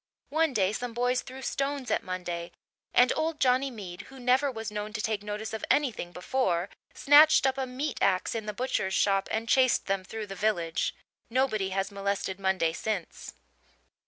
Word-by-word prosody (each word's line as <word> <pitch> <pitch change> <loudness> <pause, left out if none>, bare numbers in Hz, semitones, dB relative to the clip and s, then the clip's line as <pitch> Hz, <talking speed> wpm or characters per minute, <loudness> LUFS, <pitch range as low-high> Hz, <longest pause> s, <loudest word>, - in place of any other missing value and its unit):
One 320 0 +2
day 200 -5 +1
some 245 0 -4
boys 245 +1 +1
threw 265 +1 -10
stones 275 -1 -2
at - - +2
Monday 175 -2 -5 0.4
and 250 - +5
old 315 -1 -1
Johnny 260 +1 +3
Mead, 195 -8 -8
who 270 0 -12
never 255 +3 +2
was 225 -2 -5
known 210 0 -5
to 215 - -3
take 215 -1 -1
notice 210 +1 -5
of 220 - -5
anything 245 -11 +1
before, 180 -1 -1 0.3
snatched 295 0 +6
up 265 -1 +2
a 265 -1 -2
meat 265 +3 -3
axe 185 -2 +2
in 220 -2 -4
the - - -1
butcher's 205 -5 -1
shop 195 -1 +2
and 225 +1 -2
chased 255 +1 +3
them 195 -1 -1
through 220 +3 -6
the 195 - -7
village. 180 -5 0 0.3
Nobody 230 -6 +1
has 195 +1 -2
molested 200 -1 -2
Monday 190 -4 +1
since. 200 -2 -4
220 Hz, 180 wpm, -28 LUFS, 195-260 Hz, 0.4 s, snatched